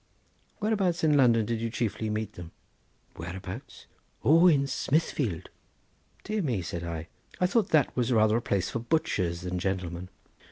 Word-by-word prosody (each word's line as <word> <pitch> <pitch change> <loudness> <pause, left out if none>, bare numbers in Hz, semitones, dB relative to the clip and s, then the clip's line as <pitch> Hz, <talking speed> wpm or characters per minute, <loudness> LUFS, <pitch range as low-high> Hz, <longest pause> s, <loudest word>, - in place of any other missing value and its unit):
"Whereabouts 200 -6 0
in 155 -2 +4
London 120 -5 +4
did 115 0 -2
you 115 - -1
chiefly 110 -2 -2
meet 105 -1 -3
them?" 85 -1 -9 0.7
"Whereabouts? 85 +3 -7 0.4
Oh, 165 +5 +6
in 145 -5 +4
Smithfield." 135 - -1 0.7
"Dear 215 0 -1
me!" 120 - -1
said 85 0 -5
I; 85 -1 -4 0.3
"I 180 - +3
thought 200 +2 +2
that 155 -4 +3
was 125 0 0
rather 110 -1 +4
a - - -1
place 95 -4 -1
for 120 - -2
butchers 95 - 0
than 90 0 -3
gentlemen." 90 -1 -3
115 Hz, 155 wpm, -28 LUFS, 90-150 Hz, 0.7 s, Oh